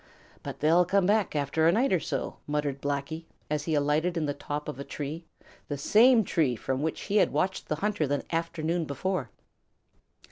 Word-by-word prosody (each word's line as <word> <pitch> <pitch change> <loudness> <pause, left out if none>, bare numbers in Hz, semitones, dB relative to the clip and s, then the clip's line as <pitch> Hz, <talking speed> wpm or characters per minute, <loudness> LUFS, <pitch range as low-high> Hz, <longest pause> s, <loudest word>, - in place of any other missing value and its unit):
"But - - -7
they'll 165 +4 +5
come 190 +2 +2
back 205 -3 +2
after 150 +2 +2
a - - +6
night 235 +4 +2
or 180 - +3
so," - - -3
muttered 145 -2 -2
Blacky, 145 +3 -3 0.3
as 150 -1 -1
he 160 - 0
alighted 150 +4 +1
in 160 - 0
the 145 - -1
top 145 +1 -5
of 130 - -5
a - - -3
tree, 150 +4 -6 0.4
the 145 - -3
same 225 - +5
tree 150 -9 +1
from 130 +4 -2
which 160 +1 -2
he 205 - 0
had - - +4
watched 190 +1 -1
the 155 - 0
hunter 200 -2 0
the 145 +1 -1
afternoon 165 0 -1
before. 145 -1 -2
160 Hz, 190 wpm, -28 LUFS, 145-180 Hz, 0.4 s, a